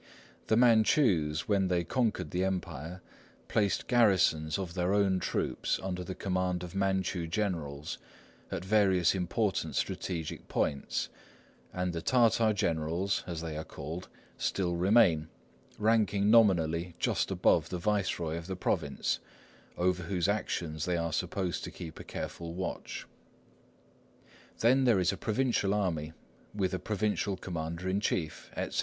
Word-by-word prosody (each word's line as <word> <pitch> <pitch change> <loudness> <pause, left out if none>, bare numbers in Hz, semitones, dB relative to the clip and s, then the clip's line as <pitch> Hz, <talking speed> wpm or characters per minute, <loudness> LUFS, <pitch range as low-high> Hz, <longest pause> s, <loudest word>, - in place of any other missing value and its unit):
The 110 - +3
Manchus, 110 - +4
when 100 -2 +2
they 90 -1 +1
conquered 120 +3 -1
the 90 +1 0
Empire, 90 -2 -3 0.4
placed 100 -2 +1
garrisons 95 -10 +3
of 95 -3 -4
their 90 +2 +1
own 95 -2 +3
troops, - - -1
under 90 -1 -3
the 95 +1 -6
command 90 -2 -1
of 90 - -7
Manchu 95 -3 0
generals, 80 -6 -3 0.5
at 90 - -4
various 95 -4 +4
important 95 +2 -1
strategic 85 -4 -3
points; 70 -1 -1 0.6
and 90 -1 -2
the 85 - -3
Tartar 115 -2 +4
generals, 85 0 0
as 85 -3 -4
they 80 -2 -4
are 80 - -3
called, 85 +4 -7 0.3
still 90 -3 0
remain, 90 -4 +4 0.5
ranking 105 -2 +3
nominally 85 -6 +4
just - - 0
above - - +3
the 90 - -3
viceroy 90 -4 0
of 85 0 -7
the 95 - -3
province, 90 - -1 0.6
over 90 0 +1
whose 90 0 0
actions 85 -6 -1
they 90 -1 0
are 85 -1 -2
supposed 90 +1 -2
to - - -4
keep 80 -2 -9
a - - -7
careful 85 0 -6
watch. 95 0 -4 1.6
Then 130 +3 +4
there 115 -6 +5
is 90 -1 +3
a - - -3
provincial 110 -2 +1
army, 80 -6 -1 0.4
with 95 -2 0
a 95 - -1
provincial 105 0 -1
commander 85 0 -4
in 95 +2 +1
chief, 80 -7 -2
etc. - - -2
90 Hz, 140 wpm, -31 LUFS, 85-100 Hz, 1.6 s, there